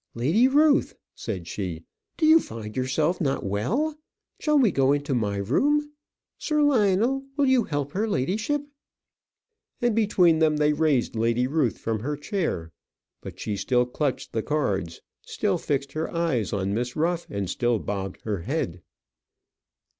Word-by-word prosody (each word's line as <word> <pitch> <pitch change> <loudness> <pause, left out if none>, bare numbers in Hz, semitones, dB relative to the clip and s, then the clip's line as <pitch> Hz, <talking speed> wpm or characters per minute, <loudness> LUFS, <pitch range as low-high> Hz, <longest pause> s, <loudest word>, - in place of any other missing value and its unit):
"Lady 160 - +3
Ruth," 295 +2 +3 0.2
said 95 -7 -5
she, 85 -4 -5 0.3
"do 320 - +2
you 315 +1 +7
find 110 - -8
yourself 150 +8 0
not 135 -8 -1
well? 215 - -1 0.4
Shall 300 -1 +2
we 245 -8 +4
go 135 -2 +3
into 145 -1 -1
my 105 -5 0
room? 295 - +1 0.5
Sir 300 -1 +1
Lionel, 240 0 +2
will 285 - +3
you 260 -4 +3
help 145 -2 -3
her 210 +6 -1
ladyship?" 210 - -1 1.2
And 240 -3 +1
between 180 -7 +3
them 155 -1 +3
they 150 0 +3
raised 145 -6 +1
Lady 115 +2 +1
Ruth 135 -3 0
from 110 -1 -2
her 145 +6 -3
chair. 150 - -3 0.5
But - - -9
she 105 - -3
still 125 +5 +1
clutched 130 +2 -3
the 110 - 0
cards, 100 - -2 0.2
still - - -1
fixed 140 -1 -2
her 155 +2 -3
eyes 165 - -1
on 100 0 -1
Miss 120 +3 -2
Ruff, 170 +2 0
and 100 -1 -3
still 120 +5 0
bobbed 95 -3 -5
her 105 -4 -3
head. 90 - -3
145 Hz, 155 wpm, -25 LUFS, -, 1.2 s, you